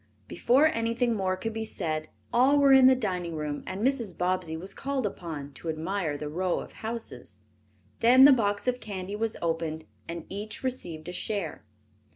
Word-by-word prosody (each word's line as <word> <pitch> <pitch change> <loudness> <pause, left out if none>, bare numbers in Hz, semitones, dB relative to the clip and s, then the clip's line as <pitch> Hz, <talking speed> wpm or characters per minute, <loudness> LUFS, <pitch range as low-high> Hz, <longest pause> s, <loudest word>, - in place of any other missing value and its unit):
Before 255 - +3
anything 230 -3 +1
more 190 -3 0
could 225 +3 -4
be 225 0 -3
said 155 -7 -3 0.2
all 260 +4 +5
were 280 -1 +6
in 265 -1 +8
the 260 - +6
dining 180 -8 -2
room 150 -1 -3
and 195 +5 -3
Mrs. 240 -9 0
Bobbsey 180 -3 -1
was 190 +4 -6
called 270 -3 -2
upon 160 -7 -5
to 165 - -7
admire 160 -1 -2
the 150 - -5
row 175 +4 -1
of - - -8
houses. 220 - -7 0.6
Then 255 +3 +7
the 285 - +9
box 205 -2 0
of 250 0 +1
candy 195 -2 -5
was 225 +1 -2
opened 165 -1 -2 0.2
and 170 -1 -5
each 210 +5 -6
received 175 -12 -4
a 180 - -5
share. 195 -4 -3
195 Hz, 180 wpm, -28 LUFS, 165-235 Hz, 0.6 s, the